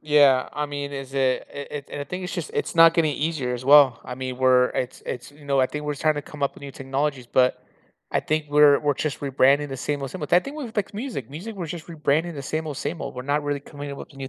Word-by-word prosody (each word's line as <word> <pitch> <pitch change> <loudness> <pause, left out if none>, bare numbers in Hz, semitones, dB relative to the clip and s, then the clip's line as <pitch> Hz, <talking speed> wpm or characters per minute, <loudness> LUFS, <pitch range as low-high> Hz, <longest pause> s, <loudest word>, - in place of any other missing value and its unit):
Yeah, 145 -4 +4
I 150 0 -2
mean, 145 0 -5
is 135 -1 -7
it 130 -2 +1
it 140 0 -7
it 145 -2 -6
and - - -5
I 145 - -3
think 180 +5 -5
it's 180 - -5
just - - -4
it's 440 - -2
not 165 0 +8
getting 155 -3 +2
easier 145 -5 -1
as 125 +1 -6
well. 140 -4 +7
I 125 - -6
mean, 130 -1 -4
we're 130 -1 +5
it's 125 0 -4
it's, 125 +2 -5
you 145 0 -17
know, 140 -1 +2
I 130 - +4
think 150 +2 -6
we're 150 - -1
just 140 - -10
tryna 150 -2 +1
come 150 -2 -9
up 140 - +1
with - - -15
new 140 -1 -7
technologies. 135 -1 -2
But, 125 +1 +2 0.5
I - - +3
think 155 0 -1
we're 145 -1 +6
we're 145 -1 +1
just 150 +1 -3
rebranding 140 +1 +3
the 135 - -4
same 145 +2 -3
old 135 - -4
same 185 - -7
old 150 - -5
I 175 - +7
think 280 +2 -8
we've 250 -7 -6
vexed 210 -1 -1
music. 210 - -5
Music, 195 +10 -7
we're 175 -3 -4
just 160 0 -7
rebranding 160 0 0
the 140 - -6
same 155 +3 -3
old 145 -3 -5
same 165 +1 -4
old. - - -5
We're 125 - -5
not 145 +2 0
really 145 -1 -1
coming 145 0 -8
up 140 - -8
with - - -10
a - - -17
new 135 -1 -6
145 Hz, 290 wpm, -24 LUFS, 135-155 Hz, 0.5 s, not